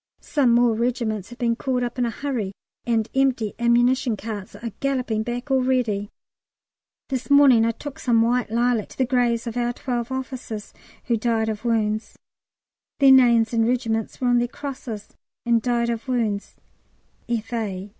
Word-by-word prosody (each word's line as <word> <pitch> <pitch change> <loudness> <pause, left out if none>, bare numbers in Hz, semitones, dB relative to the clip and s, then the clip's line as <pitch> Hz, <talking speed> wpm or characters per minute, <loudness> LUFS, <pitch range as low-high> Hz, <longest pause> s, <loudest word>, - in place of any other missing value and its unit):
Some 265 -6 +2
more 240 -1 +4
regiments 225 -3 -1
have 240 - -11
been 235 -2 +1
called 255 0 -1
up 240 +1 -4
in 245 - +2
a - - -1
hurry, 230 -6 -3 0.3
and 225 -2 +1
empty 260 -6 +1
ammunition 240 +1 +2
carts 210 -1 -7
are 230 -1 -6
galloping 255 -5 -1
back 245 +4 -4
already. 250 -6 +1 1.0
This 255 -3 -3
morning 275 -5 +6
I - - +2
took 270 +4 -9
some 230 -3 +3
white 240 0 +1
lilac 235 -1 +1
to - - -14
the 260 - +2
graves 240 -2 +1
of 235 0 -5
our 240 0 0
12 240 -1 -3
officers 255 -5 -5 0.3
who 235 -1 0
"died 220 -1 0
of 215 +1 -4
wounds." 215 -2 0 0.8
Their 275 -1 +6
names 235 -3 +5
and 225 -1 +2
regiments 230 -3 -1
were 250 - +1
on 245 0 +4
their 240 - +1
crosses, 250 -5 -7 0.4
and 235 -1 +3
"Died 235 0 0
of 230 +2 -5
wounds. 225 -5 -1 0.7
F.A. 215 -4 -3
235 Hz, 165 wpm, -23 LUFS, 225-250 Hz, 1.0 s, morning